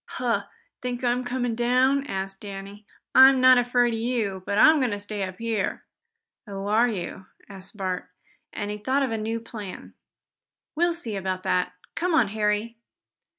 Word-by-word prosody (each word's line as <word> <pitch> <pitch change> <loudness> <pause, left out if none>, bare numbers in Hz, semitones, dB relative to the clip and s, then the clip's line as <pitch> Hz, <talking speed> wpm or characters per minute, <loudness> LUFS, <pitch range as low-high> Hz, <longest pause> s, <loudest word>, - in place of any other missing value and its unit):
"Huh! - - 0 0.4
Think 250 0 -4
I'm 245 +1 +1
coming 245 -1 -2
down?" 255 +4 +2
asked 195 -2 -5
Danny. 200 +1 -9 0.3
"I'm 265 0 +8
not 255 0 +7
afraid 245 -1 +2
of 225 - -2
you, 225 -5 -1
but 200 - -1
I'm 310 +6 +7
going 255 -2 +1
to 205 -2 -3
stay 205 0 -5
up 185 -1 -4
here." 225 -3 -2 0.6
"Oh, 195 -1 -6
are 220 +4 +3
you?" 190 -2 -5 0.2
asked 195 +1 -11
Bert, 185 -2 -3 0.4
as 205 - -4
he 210 0 -5
thought 265 +6 +1
of 260 - -1
a 225 - -1
new 225 +2 -2
plan. 215 -4 -9 0.8
"We'll 345 +2 +2
see 235 -11 -5
about 185 -1 -3
that. 185 -1 0 0.2
Come 355 0 -1
here, 260 -9 +4
Harry." 210 +2 -1
225 Hz, 170 wpm, -25 LUFS, 200-250 Hz, 0.8 s, I'm